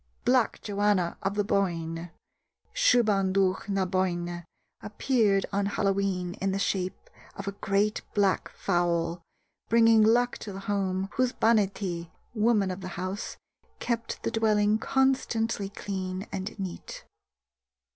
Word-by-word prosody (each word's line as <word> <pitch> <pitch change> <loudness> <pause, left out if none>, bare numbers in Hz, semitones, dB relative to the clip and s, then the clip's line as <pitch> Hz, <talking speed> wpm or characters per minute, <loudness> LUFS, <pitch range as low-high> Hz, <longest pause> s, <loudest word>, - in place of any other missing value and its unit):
Black 250 -2 +3
Joanna 205 -4 +1
of 195 +1 -1
the 205 - +1
Boyne 170 -4 -1 0.6
(Siubhan 220 - +3
Dubh 190 +1 +1
na 195 -1 +1
Boinne) 175 -2 -1 0.4
appeared 210 -2 +1
on 200 0 +1
Hallowe'en 195 -3 0
in 195 0 +1
the 195 - -1
shape 185 -2 -2 0.3
of 200 - -7
a - - 0
great 200 +1 0
black 200 -2 +2
fowl, 175 -2 0 0.5
bringing 225 -1 +6
luck 240 +3 +3
to 205 - -7
the 195 0 -7
home 195 -1 -1
whose 255 -1 +2
Banithee 195 -6 +1 0.2
(woman 215 -4 +2
of 185 +1 -6
the 185 -1 -7
house) 185 +4 -4 0.4
kept 230 -1 -3
the - - -1
dwelling 215 -1 +2
constantly 230 -6 +1
clean 190 -1 -4
and 195 +3 -5
neat. 190 -3 -7
200 Hz, 125 wpm, -28 LUFS, 185-215 Hz, 0.6 s, bringing